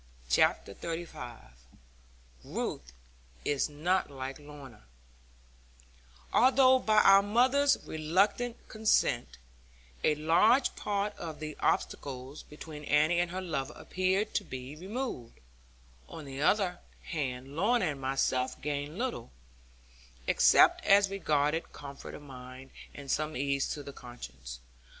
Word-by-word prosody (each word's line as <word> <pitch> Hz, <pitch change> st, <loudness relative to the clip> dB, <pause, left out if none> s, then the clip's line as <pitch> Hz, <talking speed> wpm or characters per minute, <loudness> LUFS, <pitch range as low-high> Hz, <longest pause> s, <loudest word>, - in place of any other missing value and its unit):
CHAPTER 100 Hz, -, +3 dB
XXXV 160 Hz, -5 st, -6 dB, 1.1 s
RUTH -, -, -4 dB, 0.5 s
IS 145 Hz, +1 st, +1 dB
NOT 170 Hz, +6 st, 0 dB
LIKE 135 Hz, 0 st, -6 dB
LORNA 145 Hz, -6 st, -12 dB, 1.5 s
Although 260 Hz, +1 st, +6 dB
by 215 Hz, -3 st, +4 dB
our 195 Hz, 0 st, +8 dB
mother's 255 Hz, +7 st, +3 dB
reluctant 195 Hz, +10 st, 0 dB
consent 220 Hz, -, +1 dB, 0.7 s
a 150 Hz, -, +3 dB
large 175 Hz, -, +3 dB
part 205 Hz, 0 st, -2 dB
of 160 Hz, -3 st, -6 dB
the 155 Hz, -1 st, -6 dB
obstacles 135 Hz, +1 st, -2 dB
between 150 Hz, 0 st, -10 dB
Annie 155 Hz, +4 st, +3 dB
and 175 Hz, 0 st, +1 dB
her 185 Hz, +2 st, -4 dB
lover 150 Hz, -5 st, -3 dB
appeared 190 Hz, +3 st, 0 dB
to 205 Hz, -, 0 dB
be 130 Hz, -3 st, -7 dB
removed, 190 Hz, -, -5 dB, 0.7 s
on 155 Hz, -, -8 dB
the 135 Hz, 0 st, -6 dB
other 180 Hz, +1 st, +2 dB, 0.2 s
hand 135 Hz, -3 st, -4 dB
Lorna 205 Hz, +5 st, +2 dB
and 140 Hz, -2 st, -8 dB
myself 130 Hz, -1 st, 0 dB
gained 145 Hz, +2 st, -4 dB
little, 245 Hz, -, -3 dB, 1.0 s
except -, -, +5 dB
as 200 Hz, 0 st, +5 dB
regarded 155 Hz, -4 st, 0 dB
comfort 140 Hz, -1 st, -9 dB
of -, -, -11 dB
mind, 130 Hz, -1 st, -11 dB, 0.2 s
and 140 Hz, -2 st, -6 dB
some 155 Hz, -1 st, -1 dB
ease 140 Hz, 0 st, 0 dB
to 145 Hz, -, -7 dB
the 140 Hz, -, -9 dB
conscience. 60 Hz, -, -10 dB
155 Hz, 120 wpm, -30 LUFS, 135-195 Hz, 1.5 s, our